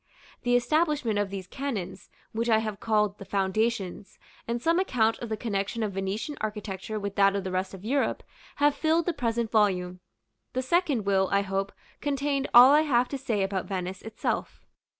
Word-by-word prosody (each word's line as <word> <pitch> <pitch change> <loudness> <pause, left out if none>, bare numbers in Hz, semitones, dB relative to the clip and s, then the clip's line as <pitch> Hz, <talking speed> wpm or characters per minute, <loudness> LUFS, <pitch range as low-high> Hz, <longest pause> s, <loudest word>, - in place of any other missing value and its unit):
The 245 -1 +2
establishment 280 -3 +1
of 205 -1 0
these 195 -1 -6
canons, 195 -6 -5 0.2
which 230 +2 -1
I 220 - +5
have 215 -2 -3
called 210 -2 +1
"the - - -7
Foundations," 195 +1 -1 0.3
and 235 +1 -1
some 330 +7 +2
account 230 -11 +1
of 240 - -6
the 220 - -2
connection 210 +1 -2
of 210 - -1
Venetian 195 +10 -3
architecture 210 -1 -4
with 200 -1 -4
that 200 0 +4
of 200 - -1
the 190 - -4
rest 185 +1 -2
of 190 +2 -12
Europe, 275 +4 0 0.3
have 290 0 +3
filled 320 +2 +1
the 350 - 0
present 235 -5 -1
volume. 185 -4 +1 0.5
The 255 - -1
second 285 - +1
will, 190 -1 +2
I 200 0 +3
hope, 195 0 -2 0.3
contain 280 -1 -1
all 245 +3 +9
I 300 +1 +6
have 250 -5 +2
to 280 - -3
say 225 -7 0
about 195 -1 -2
Venice 185 -1 -4
itself. 225 0 -4
220 Hz, 185 wpm, -27 LUFS, 195-255 Hz, 0.5 s, all